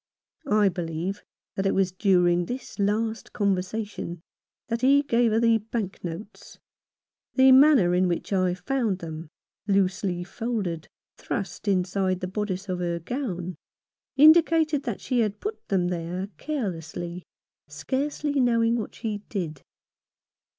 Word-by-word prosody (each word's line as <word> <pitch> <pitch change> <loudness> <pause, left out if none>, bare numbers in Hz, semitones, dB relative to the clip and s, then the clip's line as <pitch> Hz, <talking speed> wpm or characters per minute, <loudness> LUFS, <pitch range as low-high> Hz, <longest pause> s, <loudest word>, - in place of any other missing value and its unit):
I 210 -1 +4
believe 175 +1 -3 0.3
that 195 0 0
it - - +1
was 190 -1 +2
during 180 -2 +3
this 245 -3 -6
last 220 +2 -1
conversation 195 -2 -2 0.5
that 230 0 -2
he 280 +2 +5
gave 235 -4 +2
her 220 - +3
the 230 -1 +4
bank 215 -2 -5
notes. 180 +5 -8 0.8
The 265 0 +7
manner 260 -9 +6
in 180 +1 +3
which 175 +3 -2
I 185 -2 +2
found 225 0 -1
them, 160 -2 -7 0.4
loosely 190 -2 +1
folded, 195 -6 -3 0.3
thrust 200 +2 -5
inside 185 -1 +1
the 185 - -3
bodice 200 0 -3
of 180 -1 -2
her 170 -1 -1
gown, 185 - -4 0.6
indicated 315 0 +5
that 235 -5 -3
she 250 - 0
had 210 -2 0
put 425 +1 -6
them 180 -3 +1
there 180 +2 -3
carelessly, 175 - -4 0.5
scarcely 285 +1 -2
knowing 230 -2 +3
what 220 - -5
she 215 -3 -3
did. 165 -8 -4
200 Hz, 130 wpm, -26 LUFS, 180-235 Hz, 0.8 s, The